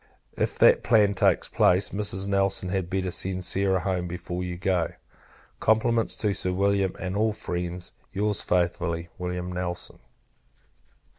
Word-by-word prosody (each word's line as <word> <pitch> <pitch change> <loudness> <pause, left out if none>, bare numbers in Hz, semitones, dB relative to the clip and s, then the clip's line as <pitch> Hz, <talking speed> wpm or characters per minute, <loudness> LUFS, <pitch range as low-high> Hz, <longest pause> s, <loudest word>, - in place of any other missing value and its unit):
If - - -1
that - - +6
plan 105 -3 +4
takes 100 - +2
place, 90 +2 +3
Mrs. 100 -1 0
Nelson 100 -1 +1
had 95 -2 -2
better 95 -1 -1
send 95 +1 0
Sarah 95 0 +2
home 90 -2 -1
before 90 +1 -5
you 90 -1 -4
go. 90 -2 0 0.7
Compliments 115 +1 +2
to 105 -2 0
Sir 90 -1 0
William, 100 0 +1
and 95 +1 -4
all 110 +1 +1
friends. 90 -2 -4 0.2
Your's 105 +1 0
very 90 -1 +3
faithfully, 85 -1 -5
Wm. 90 0 -4
NELSON. 90 -1 -4
IV. - - -32
95 Hz, 150 wpm, -26 LUFS, 90-100 Hz, 0.7 s, that